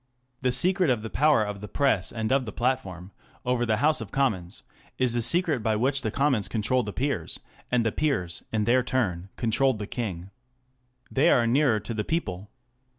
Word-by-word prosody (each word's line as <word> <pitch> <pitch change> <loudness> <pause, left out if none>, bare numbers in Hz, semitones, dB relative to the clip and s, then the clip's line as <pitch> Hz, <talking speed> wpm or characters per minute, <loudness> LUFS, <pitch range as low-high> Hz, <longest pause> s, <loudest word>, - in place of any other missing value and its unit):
The 130 -1 +1
secret 180 +3 +3
of 120 -4 0
the 110 - -6
power 145 -5 +3
of 105 -1 -5
the 105 - -7
Press 105 -10 +1
and 110 -1 -3
of 135 -1 +2
the - - -4
Platform 100 -7 -2 0.3
over 125 -1 0
the 110 -1 +2
House 150 +1 +2
of 105 - -8
Commons 105 -11 -1 0.3
is 125 -2 +2
the 120 - 0
secret 160 0 +2
by 110 0 +1
which 135 +5 +1
the 110 - -1
Commons 130 -3 +1
controlled 115 +2 0
the - - -3
Peers, 125 - -2 0.3
and 120 -2 +2
the 115 - +2
Peers 105 - -1
in 110 -1 0
their 125 +4 +3
turn 95 -8 -1
controlled 125 +2 +1
the 105 - -5
King. 100 -6 -5 0.8
They 135 - +3
are 120 - +4
nearer 120 -2 +3
the 110 +1 -4
people. 105 - -3
120 Hz, 190 wpm, -26 LUFS, 105-135 Hz, 0.8 s, are